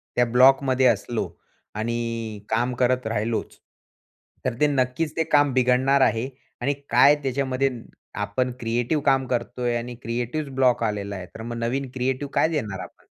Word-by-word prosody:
त्या 120 - +4
ब्लॉकमध्ये 130 +1 +5
असलो 115 +1 0 0.5
आणि 115 -1 -3
काम 120 +3 +1
करत 125 -1 +2
राहिलोच, 110 0 -2 0.9
तर - - +1
ते 150 - +4
नक्कीच 140 +3 0
ते 160 - +3
काम 145 -4 +3
बिघडणार 130 +2 +3
आहे 120 +1 +2 0.3
आणि 140 +3 +1 0.2
काय 140 +5 +6
त्याच्यामध्ये 135 0 0 0.5
आपण 125 +5 -1
क्रिएटिव 120 +6 0
काम 135 -2 +3
करतोय 120 0 -1
आणि 120 +1 -6
क्रिएटिव 120 +6 -3
ब्लॉक 125 -3 +3
आलेला 100 -2 -2
आहे, 95 - -6
तर 110 - -11
मग 120 +1 -5
नवीन 125 +3 -2
क्रिएटिव्ह 130 +2 -2
काय - - +3
देणार 110 - -3
आपण? - - -11
125 Hz, 150 wpm, -24 LUFS, 115-135 Hz, 0.9 s, काय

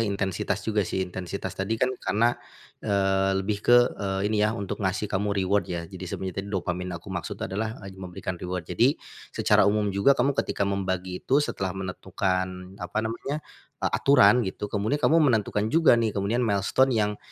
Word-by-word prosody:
intensitas 100 -4 -1
juga 110 -1 +1
sih. 95 0 -1
Intensitas 95 +1 -5
tadi 100 +4 -2
kan 130 +3 +1
karena, 110 +5 +2 0.5
eee, 95 -1 +1
lebih 100 +1 -1
ke, 120 - +5 0.2
eee, 95 -1 -1
ini 105 - +2
ya 110 +2 +2
untuk 100 0 -4
ngasih 95 +2 -1
kamu 100 +2 0 0.2
reward 100 +2 +1
ya 85 -1 -3
jadi 95 +1 -11
sebenarnya 95 +1 -4
tadi 100 - -9
dopamin 90 -2 -2
aku 95 +3 -9
maksud 90 -3 -4
adalah, 110 +3 -3
eee, 95 - -8
memberikan 90 -1 -6
reward. 90 -1 -4
Jadi, - - +2 0.3
secara - - +3
umum 105 -1 +1
juga 135 +8 +4
kamu 135 +3 +2
ketika 100 - -1
membagi 95 -2 -2
itu 135 - +2
setelah 95 -1 -3
menentukan, 95 0 -3
apa 90 +3 -6
namanya, 135 +7 -4 0.4
aturan 125 -5 +4
gitu 100 +2 -5
kemudian 105 +6 0
kamu 155 +2 +3
menentukan 110 -7 +2
juga 155 -3 +5
nih 110 -3 0
kemudian 100 +4 0
milestone 120 +3 +2
yang, 105 -1 0
100 Hz, 175 wpm, -26 LUFS, 95-110 Hz, 0.5 s, ke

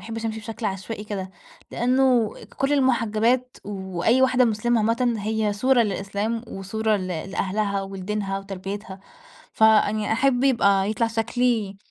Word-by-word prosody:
باحبش 225 0 -5
أمشي 220 0 -4
بشكل 225 0 -5
عشوائي 195 +3 -5
كده، 195 -3 -5 0.4
لأنه 250 -2 +2 0.2
كُلّ 275 +2 0
المحجبات 250 -2 +1
وأي 195 +4 0
واحدة 255 -1 +4
مسلمة 230 +1 +1
عامةً 230 +2 +1
هي 215 0 -1
صورة 245 +4 +3
للإسلام 205 +2 -2
وصورة 215 +2 -1
ل 185 - -4 0.2
لأهلها 200 +1 -1
ولدينها 195 +1 -3
وتربيتها. 195 0 -7 0.5
فيعني 215 -1 +3
أحب 255 +2 +2
يبقى 200 -6 +3
يطلع 230 +2 +1
شكلي 225 -2 0
220 Hz, 125 wpm, -24 LUFS, 200-240 Hz, 0.5 s, واحدة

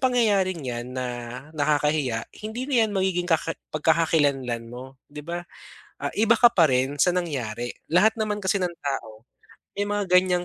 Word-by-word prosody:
pangyayaring 205 - +2
'yan 120 0 -4
na 130 -1 -2 0.5
nakakahiya, 145 -5 +1 0.2
hindi 230 +5 -4
na 280 - -2
'yan 215 - +1
magiging 185 -2 0
kaka 165 0 +1 0.2
pagkakakilanlan 145 -7 +1
mo, 130 +2 -10
'di 150 0 -9
ba, 175 +1 -4 0.6
ah, - - -2
iba 225 +2 +5
ka 240 +1 +7
pa 165 -7 +5
rin 130 +3 +1
sa 180 - +4
nangyari. 120 -9 -3 0.2
Lahat 195 +6 +5
naman 210 -1 -1
kasi 195 +1 +1
ng 180 -1 -1
tao 115 -6 -4 0.5
may 205 - 0
mga 205 0 0
gan'yang 180 -1 +3
165 Hz, 160 wpm, -25 LUFS, 130-195 Hz, 0.6 s, ka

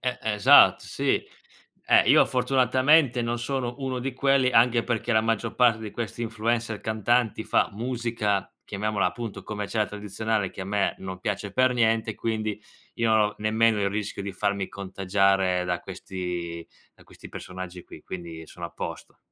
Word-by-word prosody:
Eh, 125 -1 -2
esat 105 -2 +6
sì. - - -1 0.7
Eh, - - +5
io - - +7
fortunatamente 130 +1 +3
non 120 +1 -2
sono 125 0 -3
uno 130 -2 -3
di 135 +2 -3
quelli, 135 0 +2
anche 120 0 +4
perché 120 0 -1
la 110 - +4
maggior 115 -1 -1
parte 120 -3 +4
di 110 -2 -6
questi 120 0 -5
influencer 115 0 -2
cantanti 110 +1 0
fa - - +2
musica, 115 -3 -2
chiamiamola 105 0 -1
appunto 115 -3 -5
commerciale, 105 0 -2
tradizionale, 105 0 -2
che 95 - -7
a - - -6
me 100 0 0
non 95 -1 -7
piace 100 0 -3
per 130 +2 +3
niente, 110 -2 +1
quindi 110 -2 -2 0.3
io 115 -1 0
non 110 - +4
ho 105 - -10
nemmeno 110 0 +2
il 100 - +1
rischio 105 0 -4
di 100 0 -5
farmi 100 0 -1
contagiare 95 -1 +1
da 90 -1 -1
questi 90 -3 -6 0.3
da - - -21
questi - - -13
personaggi 90 -1 -8
qui, - - -13
quindi 85 -3 -8
sono 85 -1 -7
a - - -13
posto. - - -7
110 Hz, 165 wpm, -26 LUFS, 100-120 Hz, 0.7 s, io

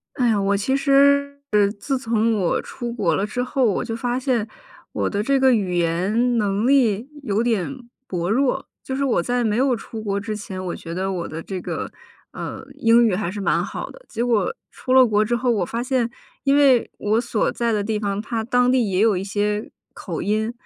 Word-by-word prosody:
哎 250 -3 +2
呀， 210 -2 +2
我 200 +1 +1
其 265 +7 0
实 280 0 +3 0.4
自 270 +3 -1
从 230 -2 +1
我 180 -3 +1
出 240 -1 -6
国 200 -9 0
了 195 - 0
之 245 +4 -2
后， 255 +1 0
我 210 0 +1
就 225 -2 -3
发 245 +2 -1
现 250 -5 0 0.4
我 - - -1
的 205 0 -1
这 275 +3 +2
个 260 -1 +5
语 190 -6 0
言 195 +9 +1
能 205 +1 +1
力 245 -5 +3 0.2
有 210 -4 0
点 240 +2 -2 0.2
薄 175 -1 -2
弱。 270 +4 +1 0.2
就 265 - -4
是 280 - -1
我 245 -9 +2
在 245 +6 0
没 215 -2 +1
有 260 0 +3
出 225 -1 -8
国 200 -2 -1
之 215 +1 -4
前， 190 -3 -6
我 175 - -3
觉 165 - -8
得 190 +1 -1
我 175 -2 -3
的 160 +1 -6
这 185 -2 -5
个， - - -4 0.4
呃， - - -7
英 230 +1 +4
语 220 - +2
还 190 -2 -2
是 205 +3 -5
蛮 200 - +1
好 - - -5
的。 - - -15
结 235 +1 -2
果 220 -6 +1 0.2
出 255 - -3
了 260 -1 +8
国 215 -2 +2
之 235 +3 0
后， 245 0 +1
我 205 -5 +1
发 235 +5 -3
现 250 -2 0 0.3
因 275 0 +3
为 270 -4 +4
我 215 +2 +1
所 235 -3 0
在 235 -1 -1
的 210 -2 0
地 215 +1 -1
方， 200 -1 -2
它 225 +1 -3
当 245 +1 +2
地 250 -5 +2
也 185 -1 0
有 215 -1 +4
一 180 - -2
些 210 +1 -1 0.2
口 170 -5 -5
音， 215 +3 0
225 Hz, 235 characters per minute, -22 LUFS, 200-250 Hz, 0.4 s, 了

